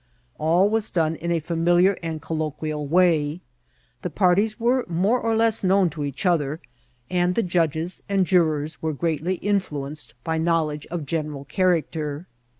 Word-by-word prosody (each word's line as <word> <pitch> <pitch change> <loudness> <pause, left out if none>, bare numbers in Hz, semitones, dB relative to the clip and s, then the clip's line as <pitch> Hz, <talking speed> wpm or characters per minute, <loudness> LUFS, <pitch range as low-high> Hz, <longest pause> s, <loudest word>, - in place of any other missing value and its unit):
All 170 +5 +3
was 220 0 0
done 160 -2 +1
in 170 +1 -3
a 170 - +2
familiar 175 +3 +3
and 165 -2 -4
colloquial 155 -2 -3
way; 165 -1 +2 0.6
the 180 - -3
parties 200 +5 +2
were 245 +2 +2
more 195 +9 +2
or 225 -1 0
less 225 -1 +2
known 190 -2 +3
to 150 -1 -5
each 140 +5 -4
other, 155 -4 +1 0.5
and 180 0 +1
judges 170 0 0
and 195 -2 +2
jurors 155 -4 +1
were 160 -1 -1
greatly 165 +4 -1
in 200 +2 +1
fluenced 145 -6 -7
by 160 0 -1
knowledge 160 -3 0
of 170 -3 -4
general 150 -2 -3
character. 160 -4 0
165 Hz, 150 wpm, -24 LUFS, 155-185 Hz, 0.6 s, All